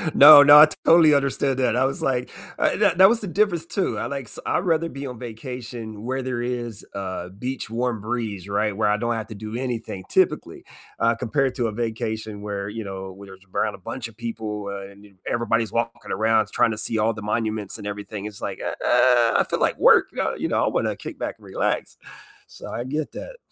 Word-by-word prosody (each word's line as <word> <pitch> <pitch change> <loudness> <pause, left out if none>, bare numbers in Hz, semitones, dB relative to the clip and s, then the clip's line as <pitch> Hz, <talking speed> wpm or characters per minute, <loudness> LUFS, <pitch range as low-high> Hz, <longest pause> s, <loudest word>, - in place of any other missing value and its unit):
No, 145 0 +11
no, 145 +1 +9
I 155 - +10 0.2
totally 165 -2 +6
understand 140 -1 +1
that. 125 -3 +1
I 130 +2 +2
was 135 - -2
like 125 -2 -1 0.3
uh, - - +1
that 170 - +2
that 190 +2 +8
was 230 - +2
the 205 - -6
difference 175 -3 +1
too. 175 - -2
I - - -3
like 135 +1 -4
s 105 - -8
I'd - - +1
rather 165 -2 +1
be 140 -2 -7
on 125 -3 -8
vacation 115 -2 -7
where 130 +1 -2
there 125 -2 -3
is 120 -3 -4
a 95 -2 -5
beach 130 -1 -4
warm 120 -1 -2
breeze, 110 -4 -4
right, 105 +1 -1
where 105 0 +1
I 105 - +2
don't 120 +1 -1
have 110 -1 -5
to 110 - -9
do 110 +2 -7
anything 115 -7 -4
typically, - - 0 0.4
uh, 115 0 +2
compared 130 +2 -1
to 120 - 0
a 110 - -3
vacation 110 -2 -4
where, 100 -1 -4
you 110 +2 -6
know, 95 -1 -7
where 100 +1 -13
there's 95 0 -14
around 105 -2 0
a - - -13
bunch 115 +6 -6
of 115 - -16
people, 110 -3 -5
uh, 100 0 -7
and 100 +1 -17 0.2
everybody's 115 -2 0
walking 115 0 -3
around, 110 0 +2
trying 115 - +3
to 110 - -4
see 110 +1 +1
all 110 +1 +2
the 110 - -8
monuments 110 -1 -2
and 105 -1 -7
everything, 105 0 -6
it's 105 -1 -8
like, - - -5
"Uh, - - -3
I 120 -2 +4
feel - - 0
at - - -3
work," - - +6
uh, - - 0
you - - -2
know, - - +1
"I - - +1
wanna - - -1
kick - - -9
back - - -4
and - - -19
relax," - - -2 0.5
so - - -11
I 120 - -4
get 150 +3 -3
that. - - -8
115 Hz, 225 wpm, -23 LUFS, 105-130 Hz, 0.5 s, No